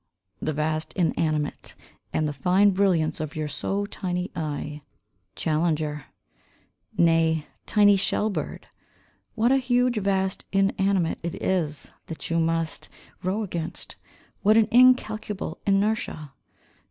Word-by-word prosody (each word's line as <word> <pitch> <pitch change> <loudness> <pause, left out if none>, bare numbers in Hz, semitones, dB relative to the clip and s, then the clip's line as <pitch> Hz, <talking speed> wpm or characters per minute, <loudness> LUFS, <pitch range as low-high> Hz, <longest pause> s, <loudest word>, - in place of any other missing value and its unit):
The 155 - -1
vast 155 +1 -2
inanimate, 155 -4 -1 0.4
And 155 - 0
the 150 - -3
fine 185 +8 +3
brilliance 185 -5 +1
of 155 -1 -5
your 155 -1 -2
so 195 +8 -2
tiny 180 -2 -3
eye. 150 -2 -4 0.5
Challenger. 155 -2 -1 0.9
Nay, 165 -2 +3 0.2
tiny 205 -2 +5
shell 210 +2 0
bird, - - -5 0.7
What 235 +2 +3
a 270 - +5
huge 250 -2 +2
vast 190 -2 0
inanimate 195 -2 +1
it 170 -1 -4
is, 155 -7 -1 0.2
that 160 0 -6
you 165 - +2
must 165 0 -1 0.3
row 195 +4 -1
against, 170 -5 -5 0.5
What 215 +2 +5
an 220 -2 +5
incalculable 220 -7 +3
inertia. 195 -7 0
180 Hz, 115 wpm, -25 LUFS, 155-205 Hz, 0.9 s, tiny